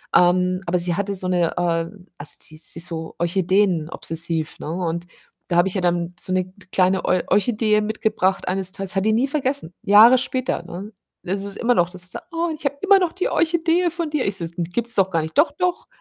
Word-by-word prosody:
ähm 180 +1 +3
aber 175 +1 +1
sie 175 0 +1
hatte 200 +1 -2
so 185 -1 -1
'ne, 175 -2 +1
äh, - - +1 0.6
also 145 - -9
die 155 - -13
sie 160 +1 -7
ist 170 - -1
so 160 -1 -6
Orchideen-obsessiv, 170 -3 0
ne? 155 - -5
Und 170 0 -3 0.4
da 170 - +1
habe 175 +2 +4
ich 190 - -2
ja 190 - -1
dann 175 0 0
so - - -4
'ne 185 0 +1
k 185 - -18 0.2
kleine 185 0 +2
Or 185 - +2
Orchidee 210 +1 +2
mitgebracht 210 -3 -1
eines 185 0 -1
Tages, 195 -1 -4
hat 195 - +1
die 220 - +3
nie 240 +5 +2
vergessen, 275 - -2
Jahre 220 +5 +8
später, 255 0 -2
ne? 200 +5 -8 0.3
Es 195 +2 -3
ist 200 - -6
immer 245 +1 +2
noch, 175 -3 +2
dass 185 -1 -4
sie - - -16
sagt: - - -9
„Oh, 335 +1 0
ich 305 -1 -8
habe 280 0 -1
immer 395 0 +6
noch 360 -3 0
die 370 - -1
Orchidee 335 +1 +1
von 335 -1 -3
dir.“ 300 -3 -1
Ich 195 -1 -1
so: 170 - -4
„Gibt's 200 +8 0
doch 190 -1 +3
gar 165 -3 +1
nicht“, 160 +1 -6
„Doch, 300 +3 +5
doch.” 360 +3 -2
190 Hz, 225 wpm, -22 LUFS, 175-245 Hz, 0.6 s, Jahre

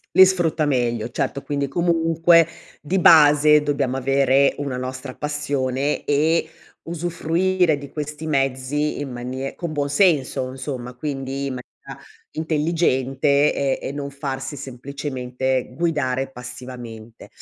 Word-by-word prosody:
Li 190 - +9
sfrutta 170 -4 +1
meglio. 120 -5 0
Certo 140 +2 -2
quindi 140 -1 -2
comunque, 165 +1 +3 0.3
di 180 +5 -1
base, 150 -3 +7
dobbiamo 140 -3 -1
avere 135 +1 +3
una 140 -3 -3
nostra 130 +1 -6
passione 145 -2 -2
e 155 +3 +2 0.3
usufruire 170 0 0
di 140 -1 -10
questi 150 +1 -5
mezzi 135 +1 0
in 145 -2 -4
manie 130 +2 -5
con 170 -2 -5
buon 145 -2 -2
senso 145 -6 +2
insomma 130 -2 -6
quindi 135 0 -4
in 135 - -3
maniera - - -13 0.3
intelligente 150 -3 +1
e 140 -1 0
e - - -3
non 140 0 -5
farsi 140 0 -5
semplicemente 130 -1 -3
guidare 140 -6 -1
passivamente. 125 -2 -10
140 Hz, 120 wpm, -22 LUFS, 130-155 Hz, 0.3 s, Li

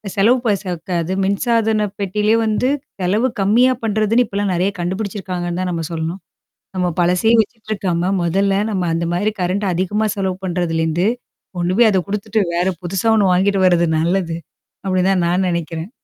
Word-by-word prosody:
செலவு 225 +6 +4
ப - - +3
சக்காது. 175 -1 -3
மின்சாதன 215 +1 +1
பெட்டியிலயே 210 +3 +1
வந்து, 220 +4 +1 0.3
செலவு 210 +8 +2
கம்மியா 235 +6 +4
பண்றதுன்னு 220 +2 +2
இப்பலாம் 200 -2 -2
நெறையா 185 +3 0
கண்டுபிடிச்சிருக்காங்கன்னு 185 -1 -3
தான் 185 -1 -1
நம்ம 165 -2 -3
சொல்லணும். 165 +3 -4 0.6
நம்ம 180 - +1
பழசயே 180 +6 +3
வச்சுட்டுருக்காம, 200 -5 -2
மொதல்ல 195 +3 +1 0.2
நம்ம 190 -3 -1
அந்த 170 +1 -1
மாதிரி 205 +5 0
கரண்ட் 185 +3 0
அதிகமா 205 +5 0
செலவு 190 -2 -2
பண்றதுலேருந்து, 170 0 0 0.5
கொண்டுபோய் 185 +7 +3
அத 195 - +2
குடுத்துட்டு 210 +1 -1 0.2
வேற 175 +2 +1 0.2
புதுசா 185 +4 -2
1 195 -4 +3
வாங்கிட்டு 195 +2 +2
வரது 170 -1 +3
நல்லது. 170 0 0 0.5
அப்படிதான் 185 -1 +2
நான் 180 +2 +1
நெனைக்கிறேன். 170 0 -3
190 Hz, 140 wpm, -19 LUFS, 175-210 Hz, 0.6 s, செலவு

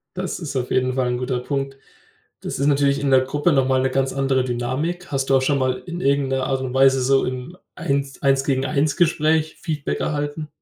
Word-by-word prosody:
Das 185 -1 -4
ist 155 -5 -6
auf 125 -1 -2
jeden 130 0 +1
Fall 130 -1 0
'n 125 - -1
guter 125 0 -2
Punkt. 135 +1 -3 0.6
Das - - -4
ist 140 - +1
natürlich 140 -1 +2
in 140 -1 0
der 130 -1 +6
Gruppe 145 +6 0
noch 135 -2 +2
mal 130 0 +2
'ne 130 - +1
ganz 135 0 0
andere 135 -1 +1
Dynamik. 130 +9 -3
Hast 135 -1 -1
du 135 - +5
auch 135 - +4
schon 140 +2 +1
mal 130 -1 0
in 175 -1 -5
irgendeiner 135 -1 +1
Art 135 -1 -1
und 130 -1 -4
Weise 135 0 +4
so 135 +1 +3
im 130 +7 -6 0.2
Eins 140 -5 -2
Eins-zu-eins-Gespräch 150 +4 +1
Feedback 150 -3 -3
erhalten? 145 +1 -3
135 Hz, 205 wpm, -22 LUFS, 130-145 Hz, 0.6 s, der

